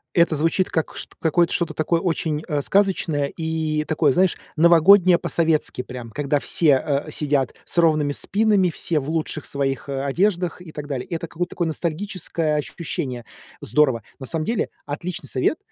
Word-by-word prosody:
Это 170 -3 +4
звучит 165 +5 +1
как 160 - -2
чт - - -8
какой 170 +1 +3
что-то 170 +1 -1
такое 165 +2 +1
очень, 160 -3 -1
э, 150 -4 0
сказочное 175 -5 +1
и 160 -2 -1
такое, 155 -2 +2
знаешь, 180 +5 +2 0.2
новогоднее 170 +3 +6
по-советски, 160 -6 0
прям, 125 -2 -8
когда 145 +3 0
все, 145 -2 +2 0.2
э, - - -7
сидят 145 -4 0
с - - -3
ровными 155 -3 +3
спинами, 200 +3 +2
все 165 -1 -2
в 140 +1 -6
лучших 160 -1 -2
своих, 135 -1 -2
а, 135 0 -2
одеждах 180 +4 0
и 175 -3 -11
так 150 -1 -7
далее. 135 -4 -4
Это 170 -2 -4
какое-то 175 +3 -3
такое 175 - -1
ностальгическое 165 -1 -2
ощущение. 135 -5 -4 0.4
Здорово. 125 -3 +2 0.2
На 135 - -7
самом 160 +1 -2
деле 230 - -1 0.2
отличный 150 +1 -5
совет, 130 - +1
160 Hz, 165 wpm, -22 LUFS, 145-175 Hz, 0.4 s, новогоднее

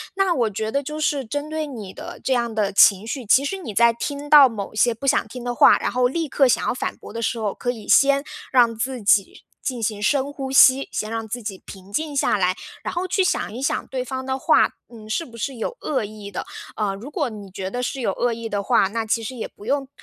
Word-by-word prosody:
那 385 -2 +2
我 240 -7 +1
觉 215 +2 -3
得， 280 +3 0
就 300 +2 -5
是 290 -2 0
针 290 +5 -4
对 315 0 -2
你 215 -9 -8
的 - - -9
这 265 - +1
样 235 -2 0
的 210 -2 0
情 200 +1 +5
绪， 255 +1 -4
其 260 +6 +4
实 390 - -2
你 290 - -7
在 235 +3 +5
听 285 +4 -5
到 290 -3 +9
某 210 -4 -6
些 235 +2 +3
不 230 +5 -7
想 - - +3
听 250 +2 -8
的 245 0 -2
话， - - +7
然 - - -2
后 250 0 +2
立 330 +3 -2
刻 275 -1 +3
想 245 - +2
要 - - +1
反 250 - -4
驳 - - -12
的 230 - -4
时 230 0 -1
候， 210 -3 -1
可 245 - -2
以 225 -4 -10
先 275 0 +5 0.3
让 240 -3 +4
自 250 +2 -3
己 200 -1 +2 0.2
进 250 -3 -3
行 215 -1 -2
深 275 +5 +1
呼 270 -2 -5
吸， 270 0 +6
先 215 - -3
让 225 -1 -3
自 240 +3 -5
己 195 -3 -6
平 195 +1 -12
静 300 +2 -2
下 260 - +2
来， 185 -1 +1 0.3
然 - - -3
后 355 +2 -2
去 380 +1 +1
想 365 - -1
一 245 - -6
想 275 - -1
对 255 -1 -3
方 260 +1 -5
的 265 0 -2
话， - - +4 0.2
嗯， 220 -3 -13
是 220 +10 -1
不 230 -4 -13
是 265 +4 -3
有 475 - -4
恶 265 -6 -1
意 210 -1 -8
的。 180 - -4 0.3
呃， 205 -2 -1
如 235 +9 -9
果 270 - -1
你 205 -3 -10
觉 190 0 -5
得 245 +4 -4
是 265 +1 -3
有 - - 0
恶 245 -1 0
意 230 0 -6
的 205 -1 -2
话， 195 - +3
那 225 +3 -3
其 225 +1 0
实 240 +4 -6
也 230 - -5
不 205 - -16
用， 275 +1 0
240 Hz, 280 characters per minute, -22 LUFS, 215-275 Hz, 0.3 s, 到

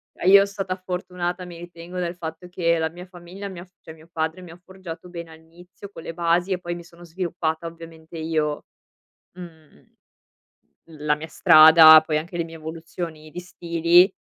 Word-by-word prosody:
Eh, - - -4
io 200 0 +8
stata 195 -2 -4
fortunata, 180 -1 -5
mi 175 -1 -10
ritengo, 175 +1 -9
dal 175 0 -3
fatto 165 0 -8
che 170 -2 0
la 160 0 -1
mia 175 +2 -11
famiglia 180 +2 -10
mi 185 -3 -9
ha 175 - -10
f 180 - -33
cioè 160 - -11
mio 160 +1 -19
padre, 160 +2 -3
mi 175 -2 -12
ha 170 - -13
forgiato 180 -2 -10
bene 170 -2 -9
all'inizio 170 +5 -15
con 165 - -11
le - - -6
basi 170 +2 0
e 185 - 0
poi 175 -1 -5
mi 175 - -9
sono 170 0 -17
sviluppata 170 -2 -3
ovviamente 165 0 -12
io, 155 -2 -2 0.7
mhmm, 160 - -15 1.1
la 150 0 +1
mia 155 +2 -8
strada, 155 0 +8
poi 155 -1 0
anche 170 +3 -6
le 170 - 0
mie 165 0 -11
evoluzioni 160 0 -8
di 175 - -7
stili. 175 +1 +2
170 Hz, 185 wpm, -23 LUFS, 160-180 Hz, 1.1 s, io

